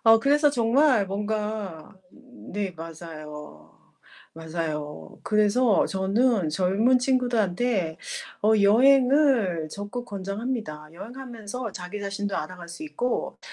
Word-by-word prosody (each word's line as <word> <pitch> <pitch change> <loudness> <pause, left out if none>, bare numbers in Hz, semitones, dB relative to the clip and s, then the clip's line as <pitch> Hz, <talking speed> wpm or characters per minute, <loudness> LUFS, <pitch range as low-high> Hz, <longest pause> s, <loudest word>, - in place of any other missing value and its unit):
어 225 0 +8
그래서 290 +4 +4
정말 245 -3 +3
뭔가 210 -4 -4 0.2
네, 245 -7 -6
맞아요. 155 - -10 0.6
맞아요. 160 -2 -5
그래서 215 +2 +3
저는 195 -1 +1
젊은 195 +10 +3
친구들한테 240 -8 +1 0.5
어 215 - +4
여행을 250 - +4
적극 205 +6 -6
권장합니다. 200 -6 -4
여행하면서 230 +2 -7
자기 185 +4 -6
자신도 200 0 -3
알아갈 175 +2 -6
수 315 - -8
있고 250 -5 -2
205 Hz, 240 characters per minute, -25 LUFS, 175-245 Hz, 0.6 s, 어